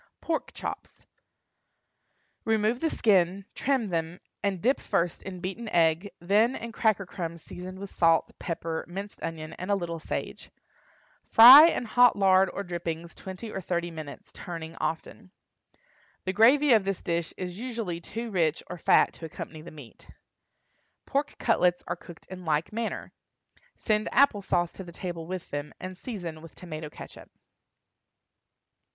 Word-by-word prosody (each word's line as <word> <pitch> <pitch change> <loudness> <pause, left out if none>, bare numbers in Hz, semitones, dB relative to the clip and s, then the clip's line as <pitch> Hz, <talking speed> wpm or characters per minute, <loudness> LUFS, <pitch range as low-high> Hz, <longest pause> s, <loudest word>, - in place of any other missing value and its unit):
PORK 325 -1 -2
CHOPS. - - -7 1.4
Remove 220 +2 +1
the 325 - +1
skin, 190 - +2
trim 260 -6 0
them, 165 +1 -2 0.2
and 200 -2 -1
dip 255 +9 +2
first 170 0 -1
in 185 -2 -8
beaten 195 +5 -5
egg, 165 +2 +2
then 210 +8 +3
in 235 - -6
cracker 215 -3 +1
crumbs 170 -3 -6
seasoned 185 +1 -8
with 195 0 -8
salt, 165 -1 +3
pepper, 165 -2 -3
minced 195 +4 -7
onion, 160 -1 -5
and 185 - -5
a 200 - +3
little 170 -3 -4
sage. - - -5 0.8
Fry 260 +8 +11
in 290 - -1
hot 245 +2 +5
lard 190 -1 +4
or 200 - -4
drippings 170 -2 -5
twenty 190 +4 -8
or 190 - -4
thirty 175 0 -2
minutes, 155 -3 -9
turning 165 -2 -7
often. 185 +5 -4 1.0
The 185 - -1
gravy 255 +7 +6
of 220 -3 +5
this 195 -1 -3
dish 170 -1 -1
is 180 +1 -5
usually 225 -9 -4
too 230 +6 -6
rich 165 -5 +1
or 180 - -6
fat - - +4
to 165 - -9
accompany 160 0 -8
the 165 - -10
meat. 140 -7 -14 1.0
Pork 280 +2 -1
cutlets 180 -6 +2
are 175 - -2
cooked 170 -1 -14
in 185 -1 -9
like 155 +3 -1
manner. 230 0 -4 0.6
Send 215 0 0
apple 265 -6 +4
sauce 175 -2 0
to 190 - -9
the 175 - -11
table 170 -2 -6
with 185 -1 -6
them, 145 +1 -5
and 185 0 -7
season 175 -7 -7
with 165 -1 -13
tomato 155 -3 -7
catsup. - - -12
185 Hz, 155 wpm, -27 LUFS, 170-215 Hz, 1.4 s, Fry